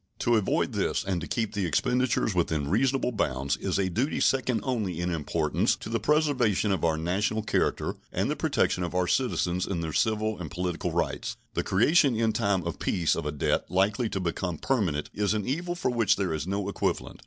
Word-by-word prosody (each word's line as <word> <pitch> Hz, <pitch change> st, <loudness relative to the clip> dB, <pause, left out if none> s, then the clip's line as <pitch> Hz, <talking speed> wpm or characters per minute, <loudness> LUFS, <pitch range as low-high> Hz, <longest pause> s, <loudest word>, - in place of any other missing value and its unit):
To 120 Hz, -, +2 dB
avoid 105 Hz, -3 st, +1 dB
this -, -, 0 dB
and 95 Hz, -3 st, -2 dB
to 85 Hz, -, -5 dB
keep 115 Hz, -3 st, -2 dB
the 100 Hz, -4 st, -1 dB
expenditures 125 Hz, -, +1 dB
within 80 Hz, -4 st, 0 dB
reasonable 130 Hz, +4 st, +2 dB
bounds 70 Hz, -, -1 dB
is -, -, -1 dB
a 95 Hz, -1 st, +1 dB
duty 120 Hz, -, -1 dB
second 130 Hz, -4 st, +2 dB
only 105 Hz, -10 st, -2 dB
in 90 Hz, +1 st, -1 dB
importance 75 Hz, -3 st, 0 dB
to -, -, -9 dB
the 115 Hz, 0 st, 0 dB
preservation 125 Hz, -7 st, +2 dB
of 95 Hz, -5 st, -1 dB
our 80 Hz, -2 st, +2 dB
national 100 Hz, +7 st, 0 dB
character 110 Hz, -, 0 dB, 0.2 s
and -, -, 0 dB
the -, -, -1 dB
protection 90 Hz, -, +1 dB
of 90 Hz, +1 st, -4 dB
our 90 Hz, 0 st, +2 dB
citizens 90 Hz, -4 st, 0 dB
in 90 Hz, -4 st, -2 dB
their 80 Hz, -2 st, -4 dB
civil 110 Hz, 0 st, 0 dB
and 85 Hz, -4 st, -5 dB
political 90 Hz, 0 st, -2 dB
rights. -, -, -2 dB, 0.2 s
The -, -, 0 dB
creation 135 Hz, -, +3 dB
in 110 Hz, 0 st, +1 dB
time 100 Hz, -5 st, +1 dB
of 85 Hz, -1 st, -4 dB
peace 85 Hz, -3 st, +1 dB
of -, -, -3 dB
a -, -, -1 dB
debt 75 Hz, -, 0 dB
likely 105 Hz, +6 st, +1 dB
to 95 Hz, -, -2 dB
become 90 Hz, -1 st, -2 dB
permanent 90 Hz, -, -1 dB
is 105 Hz, +1 st, 0 dB
an 105 Hz, -2 st, -2 dB
evil 175 Hz, +6 st, -2 dB
for 150 Hz, -7 st, -1 dB
which 115 Hz, -5 st, +3 dB
there 95 Hz, -5 st, -1 dB
is 80 Hz, +2 st, -3 dB
no 100 Hz, +1 st, -2 dB
equivalent. 100 Hz, -, -2 dB
100 Hz, 205 wpm, -27 LUFS, 85-115 Hz, 0.2 s, creation